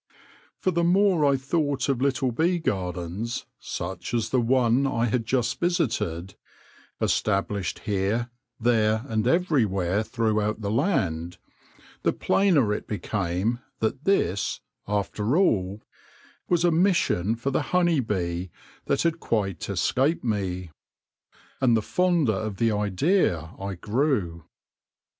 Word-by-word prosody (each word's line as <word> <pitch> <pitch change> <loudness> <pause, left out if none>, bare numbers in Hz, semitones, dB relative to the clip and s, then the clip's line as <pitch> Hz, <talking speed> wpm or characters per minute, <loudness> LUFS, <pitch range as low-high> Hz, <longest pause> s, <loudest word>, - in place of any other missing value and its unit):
" - - -29
For 185 - +3
the 170 0 +1
more 185 -1 +3
I 135 - +2
thought 140 0 -1
of 135 -3 0
little 130 -2 +1
bee 170 +9 +1
gardens, 95 - -3
such 90 +4 -5
as 115 -2 -1
the 130 - +3
one 125 +2 +3
I 115 -3 0
had 115 -1 -1
just 125 -2 0
visited, 105 - -1 0.7
established 100 -2 0
here, 105 +3 0 0.3
there, 110 -2 +2
and 110 -2 0
everywhere 110 - +2
throughout 110 -1 -1
the 100 -1 -2
land, 90 - 0 0.6
the - - +2
plainer 155 - +2
it - - -5
became 100 +2 -1 0.2
that 130 +7 -2
this, 105 - +1 0.3
after 105 +5 0
all, 100 - +1 0.7
was 175 -1 +3
a 175 - +4
mission 160 - +2
for 125 +4 -2
the - - +1
honey 175 -4 +3
bee 90 -6 -2 0.4
that - - +1
had 165 0 0
quite 100 - -2
escaped 140 +6 +1
me; 95 -6 -2 0.9
and 120 -3 +4
the 110 - -1
fonder 175 - +2
of 105 0 -3
the 115 +1 +2
idea 105 - +1
I 100 0 -4
grew. 105 - -1
115 Hz, 130 wpm, -25 LUFS, 100-140 Hz, 0.9 s, a